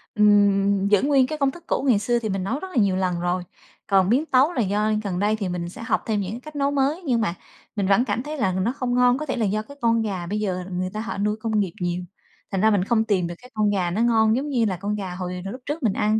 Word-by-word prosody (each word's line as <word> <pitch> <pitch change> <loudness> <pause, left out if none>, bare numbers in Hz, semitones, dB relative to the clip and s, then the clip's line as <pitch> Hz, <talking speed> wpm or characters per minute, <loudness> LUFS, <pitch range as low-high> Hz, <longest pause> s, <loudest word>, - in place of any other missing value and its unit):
Ừm, 200 -2 +4
giữ 205 -1 +4
nguyên 275 -2 +3
cái 310 +2 -4
công 275 -2 +2
thức 345 +4 -13
cũ - - 0
ngày 220 -5 +4
xưa 240 +3 +1
thì 220 -2 -3
mình 195 -1 -2
nấu 235 +9 -2
rất 380 - -6
là - - -11
nhiều 195 -2 +1
lần 185 -2 0
rồi. 175 +1 -1 0.4
Còn 190 -2 +3
biến 265 +7 +2
tấu 275 +3 +3
là 245 - 0
do 210 +2 +1
gần 185 -3 -2
đây 210 +2 +2
thì 200 -4 -3
mình 175 -1 -3
sẽ 185 - -9
học - - 0
thêm 215 -2 0
những 200 +5 -5
cách 305 +3 -12
nấu 280 0 +1
mới, 285 +4 0
nhưng 240 -4 +1
mà 205 -6 0 0.4
mình 200 -3 0
vẫn 200 +6 +4
cảm 240 - -2
thấy 300 +1 -5
mình 185 -2 +1
nó 230 - +1
không 255 -3 -2
ngon. 250 0 +4
Có 305 - -4
thể 265 - -2
là 225 - +1
do 210 +2 0
cái 280 +6 -13
con 230 -1 +3
gà 195 -5 -3
bây 210 +4 -2
giờ 185 -3 -2
người 185 +1 -2
ta 215 - -4
họ 230 -2 -5
nuôi 210 +1 0
công 220 -1 0
nghiệp 190 -5 -1
nhiều, 175 0 -1 0.5
thành 195 -1 0
ra 220 - +5
mình 200 -3 +2
không 220 +2 +2
tìm 195 -6 0
được 175 - -6
cái 250 +1 -17
con 215 -1 +1
gà 185 -4 0
nó 205 +6 -1
ngon 225 -2 +3
giống 280 +4 -2
như 240 -5 +1
là 190 -4 -1
con 205 +3 -2
gà 190 -3 -5
hồi 180 0 -4
hồi 195 - -4
lúc 255 - -9
trước 295 +1 -4
mình 215 -4 +2
ăn. 215 0 +1
210 Hz, 300 wpm, -23 LUFS, 195-245 Hz, 0.5 s, ra